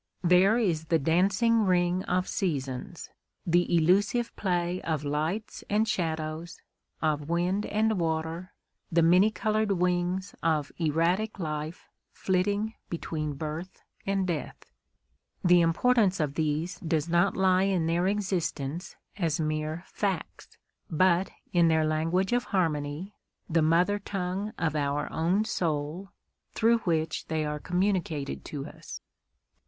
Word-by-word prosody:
There 180 +5 +5
is 170 -9 0
the 165 0 +2
dancing 195 - +3
ring 180 0 +2
of 180 +1 0
seasons; 150 +1 -3 0.3
the 175 0 +2
elusive 200 +8 +2
play 180 -1 -1
of 155 -3 -2
lights 155 +9 -2
and 215 +2 +2
shadows, 160 -1 -3 0.4
of 150 -1 0
wind 180 +4 0
and 215 -1 +1
water; 165 +2 -2 0.4
the 170 0 +4
many 180 +5 +5
coloured 215 -1 0
wings 180 +1 0
of 155 -3 0
erratic 170 +7 +1
life 155 -1 -5 0.3
flitting 200 +4 0 0.2
between 155 -3 -3
birth 155 +5 -6 0.2
and 195 -1 0
death. 170 -5 -5 0.7
The 175 -1 +6
importance 190 +3 +3
of 150 -3 0
these 160 +4 -1
does 160 -2 -1
not 175 +3 +2
lie 190 0 +3
in 180 -4 +1
their 170 +3 +1
existence 175 -6 -2 0.2
as 165 -4 0
mere 155 +2 -2
facts, 195 -5 -4 0.3
but 180 +3 +3 0.2
in 170 -2 +5
their 160 -1 +3
language 165 +6 0
of 245 0 +1
harmony, 165 0 -1 0.3
the 165 0 +2
mother 175 +6 +3
tongue 195 +1 -3
of 160 -2 -1
our 145 0 -1
own 180 +7 +1
soul, 165 -1 -2 0.5
through 230 +1 +4
which 160 -5 -1
they 160 -1 -1
are 150 0 -3
communicated 180 -5 -1
to 140 -2 -5
us. - - -9
175 Hz, 125 wpm, -28 LUFS, 155-190 Hz, 0.7 s, The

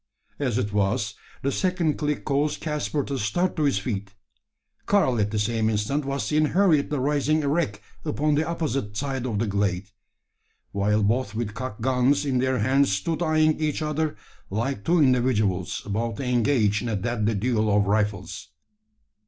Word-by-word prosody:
As 125 -6 0
it 105 -5 -1
was, 100 +1 0 0.3
the 140 - +1
second 180 -3 0
click 150 -1 -2
caused 145 +1 0
Caspar 150 -1 -2
to 135 -1 -3
start 175 - 0
to 155 -3 +1
his 140 -8 +2
feet. 100 -1 -4 0.7
Karl 130 - +3
at 105 -1 +1
the 105 - -2
same 110 +1 +1
instant 110 +7 -1
was 140 0 -2
seen 155 0 +2
hurriedly 155 -4 +2
rising 145 +3 +1
erect 140 -8 0 0.2
upon 150 0 0
the 155 +2 +1
opposite 135 -11 -2
side 135 -2 -2
of 110 -4 -2
the 115 - +1
glade, 100 -1 -1 0.8
while 105 +1 +1
both 110 +1 0
with 110 -2 -3
cocked 120 -3 -6
guns 130 +3 +2
in 130 -3 +1
their 130 0 +1
hands 130 +3 +3
stood 155 - -1
eyeing 155 -2 +2
each 155 0 -1
other, 150 0 -1 0.3
like 110 +2 -2
two 175 +8 +2
individuals 110 -8 +1
about 110 +1 -2
to - - -4
engage 120 -4 +2
in 120 - -3
a 110 - 0
deadly 110 +1 -1
duel 110 0 +1
of 100 0 +3
rifles! 105 -6 -1
125 Hz, 170 wpm, -25 LUFS, 105-150 Hz, 0.8 s, Karl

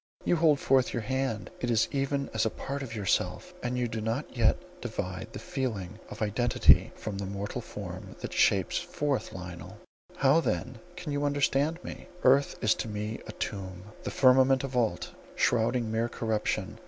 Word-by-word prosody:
You 175 - +3
hold 155 -3 +4
forth 130 -1 +3
your 115 - -2
hand; 130 -5 -2
it 120 - -2
is 115 -2 +3
even 140 0 -1
as 110 0 +1
a 110 - +2
part 140 +5 -5
of 120 -4 -6
yourself; 100 -3 -1
and 125 +1 -2
you 125 -1 +1
do 110 -1 -4
not 115 +7 -3
yet 115 -3 +4 0.2
divide 100 -3 -4
the - - -7
feeling 110 -7 -3
of - - -4
identity 115 +3 +4
from 100 -2 -5
the 100 - -3
mortal 100 +1 -4
form - - -8
that - - -5
shapes - - +3
forth 145 -3 -2
Lionel. 90 -2 -8 0.4
How 135 +3 +5
then - - -2 0.2
can 175 -4 -5
you 145 0 -1
understand 145 +3 +1
me? - - -8 0.2
Earth 135 +2 +5
is 110 - +5
to - - -4
me 105 +1 -4
a - - -5
tomb, 95 -4 -5 0.2
the - - -4
firmament 130 +1 +5
a - - -1
vault, 125 -4 0 0.2
shrouding 115 -1 +2
mere 115 +1 0
corruption. 110 -2 -2
120 Hz, 180 wpm, -29 LUFS, 110-135 Hz, 0.4 s, How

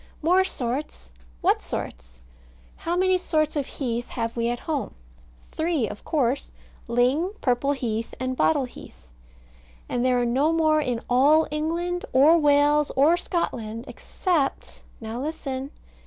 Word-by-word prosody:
More 365 +4 +4
sorts! 250 - -4 0.3
What - - +2
sorts? - - -7 0.5
How 340 +1 -3
many 370 0 +3
sorts 310 -3 0
of 285 -3 -1
heath 240 -3 -3
have 230 -1 -3
we 235 0 0
at 240 0 -3
home? 305 -4 -3 0.6
Three, 315 -7 0
of 210 - -9
course: 275 -3 0 0.4
ling, 250 +7 +2
and 405 +3 -9
purple 260 +2 +1
heath, 230 -4 -3
and 255 0 -2
bottle 285 0 +2
heath. 245 - -14 0.8
And 245 - -1
there 255 -1 +3
are 245 - +1
no 270 +6 +2
more 310 -1 +3
in 245 -5 -2
all 285 +6 +4
England, 340 +4 -2
or 300 +6 +6
Wales, 295 0 +4
or 295 +6 +5
Scotland, 235 -10 -3
except 330 -8 -2 0.2
Now, 225 +2 -5
listen. 275 -3 -4
275 Hz, 140 wpm, -25 LUFS, 240-315 Hz, 0.8 s, or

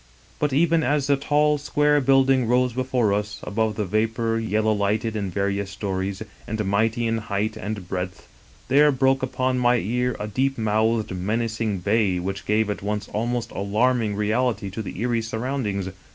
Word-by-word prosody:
But 150 -1 +1
even 165 +4 +3
as 150 -2 +1
the 140 0 +3
tall, 150 +1 +2
square 150 0 +2
build 135 0 +4
ing 130 -3 +2
rose 125 0 +2
before 125 -4 +1
us 105 0 -2
above 110 +1 -1
the 105 - -1
vapor, 115 +3 0
yellow 110 0 +1
lighted 105 +2 0
in 100 -3 -2
various 100 +1 -1
stories, 95 0 -3 0.2
and 110 0 -2
mighty 110 +4 +1
in 115 0 0
height 105 0 -2
and 105 -3 -5
breadth, 90 +1 -5 0.4
there 150 +2 +5
broke 135 0 +2
upon 130 0 0
my 120 0 +4
ear 125 +3 0
a 105 - -3
deep 130 +6 0
mouthed, 110 0 +1
menacing 110 +1 -1
bay, 100 -1 +2
which 95 +3 -4
gave 105 +1 +2
at - - -5
once 105 +1 -3
almost 120 +2 -2
alarming 110 +2 +1
reality 105 0 0
to 110 - -4
the 105 - -7
eerie 120 -1 +1
surround 120 +3 -3
ings. 100 -2 -2
110 Hz, 175 wpm, -24 LUFS, 105-125 Hz, 0.4 s, there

